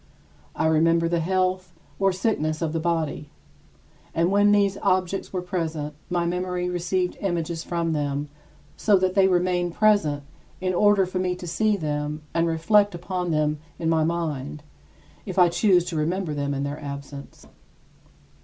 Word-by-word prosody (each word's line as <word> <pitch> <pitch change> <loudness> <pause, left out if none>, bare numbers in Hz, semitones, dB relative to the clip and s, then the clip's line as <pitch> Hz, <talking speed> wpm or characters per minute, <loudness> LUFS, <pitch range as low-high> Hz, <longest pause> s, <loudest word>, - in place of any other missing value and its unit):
I - - 0
remember 165 +1 +3
the 170 0 0
health 185 0 0 0.3
or 195 0 +3
sickness 170 -5 -1
of 160 -1 -2
the 165 - 0
body. 160 -3 -2 0.9
And 170 +3 +2
when 205 +1 +4
these 200 -1 +2
objects 185 +1 0
were 185 -2 -3
present, 160 -5 -3 0.2
my 175 -1 0
memory 180 +1 -2
received 180 +1 -1
images 170 -3 -2
from 170 -1 -1
them 145 -1 -2 0.5
so 210 -2 +3
that 185 0 +1
they 190 -1 +5
remain 180 -1 +1
present 170 -7 +2 0.4
in 185 0 -1
order 205 +1 +4
for 185 0 -3
me 180 -1 0
to 180 - -9
see 205 +5 +1
them 150 -2 -3
and 165 0 +2
reflect 200 +5 +3
upon 180 +1 -3
them 150 -1 +1 0.2
in 165 - -1
my 160 -1 +3
mind, 150 -3 -3 0.6
if 190 - -5
I 180 -2 +6
choose 180 -1 +3
to 175 - -5
remember 165 +2 -1
them 140 -1 -2
in 140 - -2
their 145 +2 -4
absence. 140 0 -8
170 Hz, 160 wpm, -24 LUFS, 155-185 Hz, 0.9 s, I